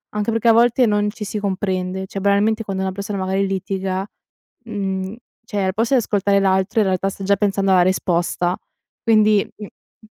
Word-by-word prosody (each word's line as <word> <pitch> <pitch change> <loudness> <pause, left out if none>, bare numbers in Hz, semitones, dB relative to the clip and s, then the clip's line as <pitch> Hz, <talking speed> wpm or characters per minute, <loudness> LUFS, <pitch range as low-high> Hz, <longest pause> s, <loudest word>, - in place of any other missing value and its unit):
anche 210 +2 0
perché 225 +1 0
a 230 - +7
volte 240 +2 +4
non 210 -1 +1
ci 210 -1 -7
si 210 +1 -4
comprende; 190 -1 -2
cioè 195 - -6
banalmente 205 +3 +2
quando 195 -2 -3
una 190 - -1
persona 200 +1 -4
magari 190 +1 0
litiga, 190 0 -2 0.6
mhmm, 195 -2 -3 0.3
cioè 205 -3 -3
al 190 0 0
posto 225 +6 0
di 255 - +5
ascoltare 200 -2 +1
l'altro 190 +3 +1
in 205 - +3
realtà 185 +1 0
sta 195 - -8
già 200 +1 +3
pensando 195 -1 0
alla 185 -1 +5
risposta 175 -1 0 0.5
quindi 215 -3 +4
mh, 210 - -7 0.3
mh 220 - -20
200 Hz, 190 wpm, -20 LUFS, 190-210 Hz, 0.6 s, a